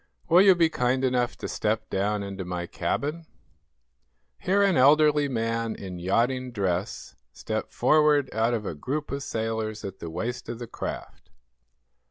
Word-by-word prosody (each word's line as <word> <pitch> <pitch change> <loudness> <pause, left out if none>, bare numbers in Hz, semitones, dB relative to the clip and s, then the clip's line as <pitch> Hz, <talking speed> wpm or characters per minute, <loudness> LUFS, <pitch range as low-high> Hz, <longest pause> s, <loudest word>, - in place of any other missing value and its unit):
Will 175 +2 +7
you 195 -2 +7
be 170 -2 +4
kind 130 -3 0
enough 125 -1 0
to - - -5
step 110 +1 -1
down 100 +1 0
into 100 -1 -5
my 90 -1 -4
cabin?" 150 - -3 1.1
Here 200 +2 +2
an 195 -3 +3
elderly 150 +2 +5
man, 115 -2 -2
in 90 -2 -7
yachting 125 +8 0
dress, 95 -2 -2 0.2
stepped - - -4
forward 150 -2 +3
out 115 +2 +1
of 105 -2 -4
a - - -3
group 140 - -4
of 140 0 -3
sailors 110 -3 -3
at 95 -1 -7
the 85 - -6
waist 115 +10 -4
of 120 - -4
the 120 - -6
craft. - - -7
115 Hz, 160 wpm, -26 LUFS, 105-145 Hz, 1.1 s, Will